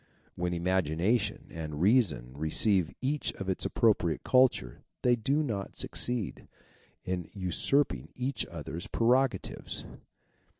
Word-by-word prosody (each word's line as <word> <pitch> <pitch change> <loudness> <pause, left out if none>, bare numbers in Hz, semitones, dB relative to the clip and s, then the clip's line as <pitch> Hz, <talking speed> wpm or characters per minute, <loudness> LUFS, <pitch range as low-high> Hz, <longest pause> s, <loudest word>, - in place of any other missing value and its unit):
When 90 0 -1
imagination 95 +5 0
and 75 -2 -5
reason 90 - +3
re 80 +2 -2
ceive 95 -1 +3
each 140 +3 0
its 95 -1 -3
appropriate 100 -8 +2
culture 125 - +3 0.2
they 125 -1 +5
do 140 +6 +1
not 105 -8 -4
succeed 120 -5 -1 0.6
in 90 -2 -3
usurping 100 - +1
each 130 +2 -1
other's 85 +6 -6
prerogatives. 120 -2 +1
100 Hz, 110 wpm, -30 LUFS, 85-125 Hz, 0.6 s, they